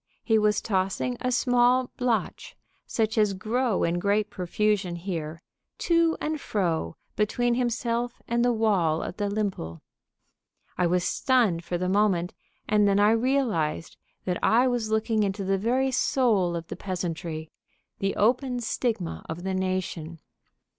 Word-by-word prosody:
He 220 -2 +3
was 210 0 +2
tossing 195 +4 -1
a 250 - 0
small 245 0 +3
blatch, 245 -2 -2 0.3
such 220 -1 0
as 210 -2 +2
grow 225 +3 0
in 170 +1 +1
great 205 +3 +1
profusion 190 0 0
here, 165 -2 -5 0.3
to 335 -2 +2
and 305 -1 -3
fro 165 - -1 0.2
between 240 +4 +1
himself 240 0 -1
and 235 0 +1
the 245 - +3
wall 195 -9 +1
of - - -6
the 205 -1 -1
limple. 195 - -3 0.9
I 180 - +2
was 180 +1 +1
stunned 225 -11 +2
for 175 +1 -2
the 180 +1 -2
moment, 190 -3 +1 0.3
and 210 -1 +3
then 200 0 +3
I 205 +1 +5
realized 225 - 0 0.3
that 180 -2 -2
I 240 +3 +4
was 240 -3 -1
looking 220 0 +1
into 200 0 -1
the 195 0 0
very 255 +5 +1
soul 220 -9 +2
of 165 -1 -4
the - - -4
peasantry, 170 -4 -4 0.5
the 195 0 -1
open 250 +3 +1
stigma 225 -6 -2
of 160 +2 -5
the 190 0 -2
nation. 185 -3 -3
210 Hz, 145 wpm, -26 LUFS, 180-240 Hz, 0.9 s, I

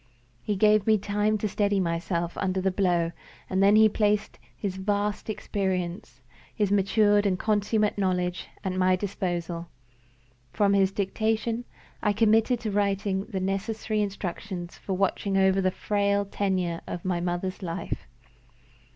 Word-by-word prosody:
He 205 - -1
gave 210 +1 +4
me 220 -1 +5
time 210 +1 0
to 215 - -1
steady 205 0 +1
myself 170 -1 -1
under 190 -1 0
the 190 +1 +1
blow; 175 -3 +1 0.4
and 190 0 0
then 200 +1 +6
he 220 0 +7
placed 210 0 0 0.2
his 190 -2 -3
vast 205 +2 -1
experience, 180 - -3 0.3
his 205 -2 +1
matured 205 +1 +3
and 185 -2 +1
consummate 210 0 +1
knowledge, 180 -2 -1 0.2
at 190 - -1
my 185 0 +3
disposal. 175 -3 -3 0.9
From 200 -1 +3
his 195 -1 +3
dictation, 220 +4 -1 0.4
I 210 - +2
committed 225 +3 +3
to 215 - -2
writing 200 -1 0
the 200 -4 -4
necessary 210 +3 -1
instructions 190 -2 -4
for 195 - -5
watching 195 +1 0
over 190 0 +4
the 185 - +2
frail 200 +1 0
tenure 185 -4 -1
of 175 - -6
my 180 -2 0
mother's 180 +2 -2
life. 170 0 -4
195 Hz, 140 wpm, -27 LUFS, 185-210 Hz, 0.9 s, he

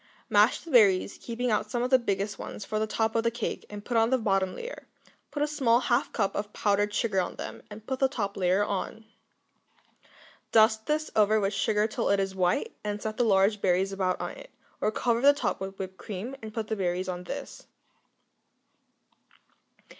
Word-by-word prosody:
Mash - - +4
the 330 - -10
berries, 200 -6 +4
keeping 240 +1 -2
out 210 0 0
some 240 0 -1
of 250 - -2
the 260 - +6
biggest 200 -2 -2
ones 205 - -7
for 215 - -2
the 220 - 0
top 220 +1 0
of 230 - +3
the 230 - +2
cake, 235 0 -4
and 205 0 -8
put 240 - -3
on 225 0 +4
the 260 - +3
bottom 195 -5 0
layer; - - -8 0.4
put 290 - -2
a - - +1
small 260 -6 +3
half 250 0 +1
cup 195 - -1
of 205 0 -3
powdered 205 0 +1
sugar 205 -2 0
on - - -4
them, - - -7
and 210 +1 -11
put 265 +1 -3
the 270 - +4
top 205 -7 -3
layer 190 +2 +2
on. 210 +2 -4 1.5
Dust 220 0 +4
this 305 +1 -1
over 215 0 +4
with 200 0 0
sugar 210 +1 +1
till 215 - -1
it 200 - +3
is 195 -1 -1
white, 180 -2 0
and 210 0 -3
set 215 0 -4
the 245 - +3
large 200 -1 +3
berries 190 +1 +2
about 185 -2 0
on - - -3
it, - - -12 0.3
or - - +2
cover 235 +1 0
the 285 +2 +7
top 285 - -2
with 195 0 -5
whipped 190 -1 -6
cream 215 +6 -6
and 220 -1 -7
put 220 0 -3
the 220 - -1
berries 185 -1 -1
on 180 -1 -5
this. - - -7
215 Hz, 205 wpm, -28 LUFS, 195-235 Hz, 1.5 s, the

